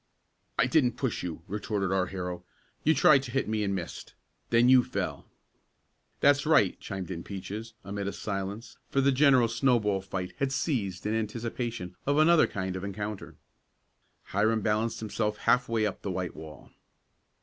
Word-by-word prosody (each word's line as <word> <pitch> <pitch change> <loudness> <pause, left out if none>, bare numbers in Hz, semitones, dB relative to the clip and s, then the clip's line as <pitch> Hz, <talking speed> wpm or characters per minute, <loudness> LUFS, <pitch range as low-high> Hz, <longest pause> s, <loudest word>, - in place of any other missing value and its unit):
"I - - +4
didn't 125 -1 +2
push 130 -5 -1
you!" 85 -2 -6
retorted 100 -1 -2
our 95 -1 +1
hero. 90 -1 -5 0.4
"You 160 - +4
tried 135 -3 +6
to 135 - -7
hit 135 +3 -1
me 110 -1 0
and 100 -1 0
missed. 85 -3 -7 0.3
Then 120 +1 +4
you 130 -1 +7
fell." - - -4 0.9
"That's 145 0 +5
right!" 150 - +3
chimed 95 -2 -6
in 85 -2 -4
Peaches, 105 +3 -7
amid 100 0 -4
a - - -1
silence, 100 +3 -5
for 135 - +1
the 140 +1 +4
general 130 -3 +5
snowball 115 -4 +1
fight 95 -1 -5
had 135 -1 0
ceased 110 - -2
in 105 - 0
anticipation 110 -3 -3
of 145 +1 +2
another 160 +1 +6
kind 95 -2 -4
of 95 - -5
an 100 - -3
encounter. 105 +1 -6 0.9
Hiram 110 +3 +1
balanced 110 +2 0
himself 105 -1 -2
half 125 -1 +2
way 115 -2 +1
up 105 - -3
the - - -4
white 90 -1 -3
wall. 80 -3 -11
105 Hz, 170 wpm, -28 LUFS, 95-125 Hz, 0.9 s, you